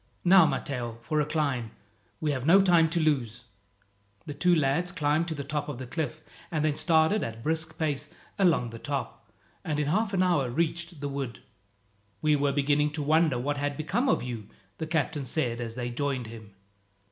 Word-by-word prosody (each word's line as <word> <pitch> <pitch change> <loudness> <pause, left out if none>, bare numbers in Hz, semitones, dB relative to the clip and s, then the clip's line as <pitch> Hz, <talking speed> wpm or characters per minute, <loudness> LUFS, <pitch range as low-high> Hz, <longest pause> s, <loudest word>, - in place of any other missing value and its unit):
"Now, 180 -2 +7
Matteo, 120 -7 -3
for 155 +4 0
a 150 - -1
climb. 140 -8 -1 0.5
We 155 -1 0
have 130 -3 -2
no 170 +7 +6
time 170 -4 +5
to 170 - 0
lose." 130 -8 0 0.8
The 145 - -5
two 175 +5 +3
lads 160 +4 +1
climbed 155 -1 +1
to 160 - -3
the 140 - -4
top 150 +1 -3
of 145 - -5
the 130 - -6
cliff, 155 +3 -4 0.3
and 155 -2 0
then 150 -2 +1
started 160 +6 +3
at 115 - -4
a - - -14
brisk 160 +5 -3
pace 145 -3 -1 0.3
along 165 - +3
the 115 - -8
top, 140 +2 -5 0.3
and 150 -2 -2
in 150 - +1
half 200 +8 +1
an 185 -2 +2
hour 150 -8 +2
reached 170 +3 -2
the 145 - -2
wood. 135 -4 -5 0.8
"We 155 -1 +3
were 145 -1 +1
beginning 145 +1 +2
to 150 -1 -2
wonder 155 -2 +3
what 145 +4 -1
had 145 0 -2
become 235 - 0
of - - +2
you," 115 -5 -6 0.3
the 160 - -3
captain 150 -3 -1
said 120 -6 -1
as 115 -1 -5
they 120 -1 -3
joined 135 -1 -2
him. 110 -3 -11
150 Hz, 195 wpm, -28 LUFS, 130-160 Hz, 0.8 s, Now